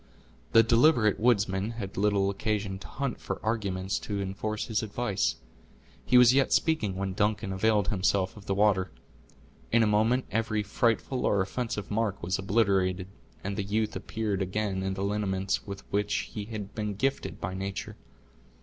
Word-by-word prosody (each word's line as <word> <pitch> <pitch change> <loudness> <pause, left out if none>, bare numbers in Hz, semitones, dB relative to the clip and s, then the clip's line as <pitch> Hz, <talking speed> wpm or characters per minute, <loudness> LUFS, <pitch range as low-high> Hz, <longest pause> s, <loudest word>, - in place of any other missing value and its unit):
The 115 - +8
deliberate 115 -3 +4
woodsman 105 -2 +2
had 100 -4 -6
little 100 -1 +2
occasion 100 -1 -2
to - - -10
hunt 140 -2 -3
for - - -4
arguments 100 -3 -1
to 100 -2 -4
enforce 100 +2 -3
his 110 -3 -1
advice. 110 -1 -1 0.7
He 125 - +4
was 125 0 +8
yet 135 0 +3
speaking 120 - +2
when 95 0 -2
Duncan 105 -1 0
availed 105 0 +2
himself 95 -1 +1
of 105 -2 -13
the 95 - 0
water. 100 -2 +3 0.8
In 115 0 +5
a - - +4
moment 110 +4 +2
every 110 0 0
frightful 120 +4 0
or 100 - +2
offensive 105 +1 -3
mark 105 -3 -1
was 90 +3 -1
obliterated, 95 -2 +1 0.3
and 100 +1 -3
the 105 - -2
youth 105 +2 -1
appeared 100 +1 -2
again 95 0 -1
in 95 0 -2
the 95 - -3
lineaments 100 -1 -1
with 100 0 -6
which 105 0 0
he 105 -2 -4
had 105 -2 -6
been 105 -2 -3
gifted 135 +7 -1
by 95 - -4
nature. 95 +1 -5
105 Hz, 165 wpm, -28 LUFS, 95-110 Hz, 0.8 s, The